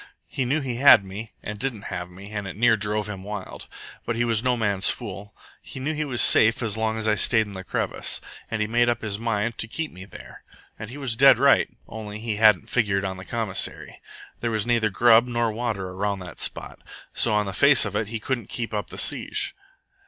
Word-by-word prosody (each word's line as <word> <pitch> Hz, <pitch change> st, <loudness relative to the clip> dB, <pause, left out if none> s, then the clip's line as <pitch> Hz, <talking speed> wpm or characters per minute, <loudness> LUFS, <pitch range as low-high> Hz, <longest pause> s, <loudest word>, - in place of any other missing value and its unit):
He 130 Hz, -, -3 dB
knew 145 Hz, +5 st, 0 dB
he 125 Hz, -3 st, -3 dB
had 120 Hz, -6 st, +7 dB
me 105 Hz, +4 st, -8 dB
and 105 Hz, 0 st, -6 dB
didn't 125 Hz, -5 st, -2 dB
have 90 Hz, 0 st, -5 dB
me, 95 Hz, +3 st, -12 dB
and 105 Hz, -2 st, -4 dB
it 95 Hz, -, -7 dB
near 115 Hz, 0 st, +4 dB
drove 105 Hz, 0 st, -1 dB
him 95 Hz, -3 st, -7 dB
wild. 100 Hz, -2 st, -7 dB, 0.4 s
But 115 Hz, -, -3 dB
he 120 Hz, +1 st, 0 dB
was 115 Hz, -1 st, 0 dB
no 125 Hz, -1 st, +1 dB
man's 100 Hz, -4 st, +1 dB
fool. 105 Hz, -3 st, -6 dB, 0.3 s
He -, -, -9 dB
knew 145 Hz, +4 st, -2 dB
he 155 Hz, 0 st, -2 dB
was 125 Hz, -4 st, +3 dB
safe 115 Hz, +2 st, +5 dB
as 110 Hz, -3 st, +1 dB
long 110 Hz, 0 st, -1 dB
as 110 Hz, 0 st, -2 dB
I 110 Hz, -, +3 dB
stayed 110 Hz, +1 st, +2 dB
in 105 Hz, -, -10 dB
the 95 Hz, -1 st, -7 dB
crevice, -, -, -1 dB, 0.3 s
and 110 Hz, -1 st, -1 dB
he -, -, -3 dB
made 120 Hz, +2 st, +2 dB
up 120 Hz, -1 st, -2 dB
his 105 Hz, -1 st, -3 dB
mind 115 Hz, 0 st, -2 dB
to 110 Hz, -, -2 dB
keep 160 Hz, +7 st, -5 dB
me 95 Hz, +1 st, -11 dB
there. 100 Hz, -, -13 dB, 0.4 s
And 110 Hz, -, -7 dB
he 130 Hz, -, -9 dB
was 135 Hz, -5 st, -2 dB
dead 135 Hz, 0 st, +7 dB
right, 140 Hz, +3 st, +4 dB, 0.2 s
only 105 Hz, -2 st, -7 dB
he 110 Hz, -1 st, -4 dB
hadn't 105 Hz, -4 st, +4 dB
figured 100 Hz, -5 st, 0 dB
on 95 Hz, -1 st, -4 dB
the 95 Hz, -, -10 dB
commissary. 110 Hz, -5 st, -3 dB, 0.4 s
There 115 Hz, -, -2 dB
was 110 Hz, -2 st, -1 dB
neither 115 Hz, -2 st, +1 dB
grub 115 Hz, +3 st, +5 dB
nor 120 Hz, -2 st, 0 dB
water 110 Hz, -5 st, -3 dB
around 100 Hz, +2 st, -2 dB
that 90 Hz, -, -10 dB
spot, -, -, -3 dB, 0.3 s
so 110 Hz, -2 st, +2 dB
on 105 Hz, 0 st, +1 dB
the 95 Hz, -, -5 dB
face 140 Hz, +3 st, +5 dB
of 105 Hz, 0 st, -5 dB
it 110 Hz, 0 st, -1 dB
he 115 Hz, +1 st, -5 dB
couldn't 120 Hz, -1 st, -4 dB
keep 115 Hz, -2 st, -5 dB
up 105 Hz, -1 st, -3 dB
the -, -, -10 dB
siege. -, -, 0 dB
110 Hz, 230 wpm, -24 LUFS, 105-120 Hz, 0.4 s, had